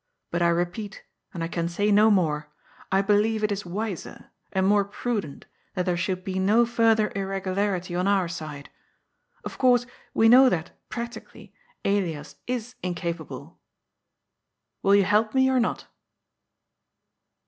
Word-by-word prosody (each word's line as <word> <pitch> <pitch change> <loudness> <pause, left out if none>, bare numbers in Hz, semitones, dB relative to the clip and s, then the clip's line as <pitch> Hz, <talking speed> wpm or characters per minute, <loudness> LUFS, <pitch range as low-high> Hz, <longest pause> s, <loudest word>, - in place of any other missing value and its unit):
But 170 - -1
I 170 - +4
repeat, 175 +4 -2 0.3
and 170 -3 -5
I - - -1
can 170 0 -2
say 205 +4 0
no 210 +2 +6
more, 150 -7 +1 0.4
I 195 +1 +3
believe 215 +2 +2
it 210 - +1
is 200 -2 -3
wiser, 200 0 -5 0.2
and 190 0 +1
more 205 +1 +4
prudent, 200 - -4 0.3
that 180 -2 -1
there 180 -2 +1
should 185 +2 -2
be 190 0 -3
no 215 +5 +4
further 225 -2 +2
irregularity 195 -1 -2
on 180 +2 0
our 195 -3 +2
side. 155 -4 -7 0.7
Of - - -7
course 245 -2 +4 0.3
we 225 - +5
know 255 +3 +8
that, 165 -6 -2 0.2
practically, 235 0 -8 0.3
Elias 170 -7 -1
is 245 -1 -3
incapable. 170 -3 -5 1.2
Will 200 +1 +4
you 200 - +5
help 215 +4 +2
me, 265 0 +4
or 260 - +3
not?'' 235 - -1
195 Hz, 145 wpm, -25 LUFS, 175-220 Hz, 1.2 s, know